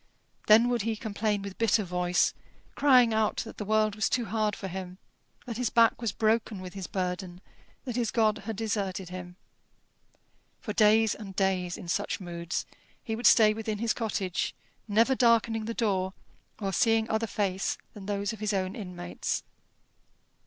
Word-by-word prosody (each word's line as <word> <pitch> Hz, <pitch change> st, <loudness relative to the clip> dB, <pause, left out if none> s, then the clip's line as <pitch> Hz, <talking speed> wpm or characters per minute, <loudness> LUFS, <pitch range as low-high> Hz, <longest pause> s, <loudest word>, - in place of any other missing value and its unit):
Then 220 Hz, +3 st, +7 dB
would 240 Hz, -2 st, +1 dB
he 225 Hz, +1 st, -1 dB
complain 210 Hz, -1 st, -2 dB
with 200 Hz, -1 st, -8 dB
bitter 225 Hz, -1 st, +3 dB
voice, 180 Hz, -1 st, +1 dB, 0.4 s
crying 250 Hz, -5 st, +5 dB
out 220 Hz, -1 st, +1 dB
that 225 Hz, -, -10 dB
the -, -, -2 dB
world 215 Hz, 0 st, +2 dB
was 210 Hz, +1 st, 0 dB
too 245 Hz, -2 st, 0 dB
hard 215 Hz, 0 st, 0 dB
for 195 Hz, -, -6 dB
him, 185 Hz, 0 st, -6 dB, 0.5 s
that 235 Hz, -4 st, -5 dB
his 245 Hz, -2 st, 0 dB
back 230 Hz, 0 st, +4 dB
was 230 Hz, -3 st, 0 dB
broken 220 Hz, -2 st, 0 dB
with 185 Hz, -1 st, -8 dB
his 195 Hz, -2 st, -6 dB
burden, 180 Hz, -1 st, -3 dB, 0.5 s
that 245 Hz, -3 st, -4 dB
his 235 Hz, -3 st, 0 dB
God 220 Hz, -2 st, +2 dB
had 225 Hz, -1 st, -5 dB
deserted 200 Hz, -4 st, -2 dB
him. 180 Hz, -1 st, -8 dB, 1.2 s
For 210 Hz, -, -5 dB
days 215 Hz, +1 st, +4 dB
and 195 Hz, -3 st, -9 dB
days, 185 Hz, -2 st, 0 dB
in -, -, -9 dB
such 200 Hz, +4 st, -1 dB
moods, 170 Hz, -2 st, -4 dB, 0.4 s
he 220 Hz, -, -3 dB
would 235 Hz, -, +3 dB
stay 215 Hz, -2 st, +6 dB
within 220 Hz, -1 st, -3 dB
his 225 Hz, +1 st, 0 dB
cottage, 200 Hz, -5 st, -2 dB, 0.3 s
never 225 Hz, +5 st, +3 dB
darkening 230 Hz, -3 st, +3 dB
the 230 Hz, +1 st, -4 dB
door 190 Hz, -4 st, 0 dB, 0.5 s
or 195 Hz, -2 st, -2 dB
seeing 225 Hz, +3 st, +3 dB
other 220 Hz, 0 st, 0 dB
face 195 Hz, -2 st, -1 dB, 0.2 s
than 200 Hz, -2 st, -10 dB
those 205 Hz, +1 st, -1 dB
of 220 Hz, -, -9 dB
his 210 Hz, 0 st, -1 dB
own 190 Hz, 0 st, -1 dB
inmates. 180 Hz, -4 st, -4 dB
210 Hz, 170 wpm, -28 LUFS, 190-225 Hz, 1.2 s, Then